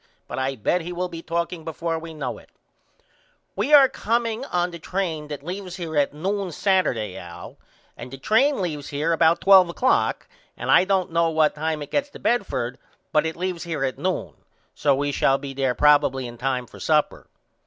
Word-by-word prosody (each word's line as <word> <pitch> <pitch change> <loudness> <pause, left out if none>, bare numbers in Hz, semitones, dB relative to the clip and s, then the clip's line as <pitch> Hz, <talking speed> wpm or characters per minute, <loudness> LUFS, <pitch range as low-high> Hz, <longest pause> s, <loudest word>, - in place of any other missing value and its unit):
But - - -5
I 135 +1 -1
bet 135 - 0
he 170 +2 -6
will 180 +1 -3
be 165 -1 -7
talking 170 0 -3
before 165 +1 -3
we 165 0 -9
know 150 - -4
it. - - -20 1.1
We 295 - -1
are 285 -3 +9
comeingon 230 -7 -1
the 170 - -8
train 165 -4 -3
that 145 -2 -7
leaves 180 +1 -6
here 165 -3 -5
at 145 -1 +2
noon 190 +5 -3
Saturday 150 - 0
Al 85 0 -10 0.4
and - - -9
the 135 - -9
train 220 - +2
leaves 150 -5 -4
here 150 +3 -1
about 165 0 +3
12 190 -3 +7
o'clock 250 +9 +1 0.3
and - - -2
I - - +6
don't 190 -3 0
know 165 0 +2
what 155 -1 +2
time 155 0 -2
it - - -12
gets 290 0 0
to - - -12
Bedford 135 - -1 0.3
but 155 0 +2
it 160 - -4
leaves 180 -1 -3
here 160 -5 -3
at 130 -1 -2
noon 185 0 -2 0.4
so 140 -2 +2
we 145 +1 -1
shall 135 -1 +2
be 140 -1 -7
there 135 -2 0
probily 145 -3 +3
in 120 -1 -9
time 130 -1 -1
for - - -14
supper. 155 -1 0
165 Hz, 195 wpm, -23 LUFS, 145-185 Hz, 1.1 s, are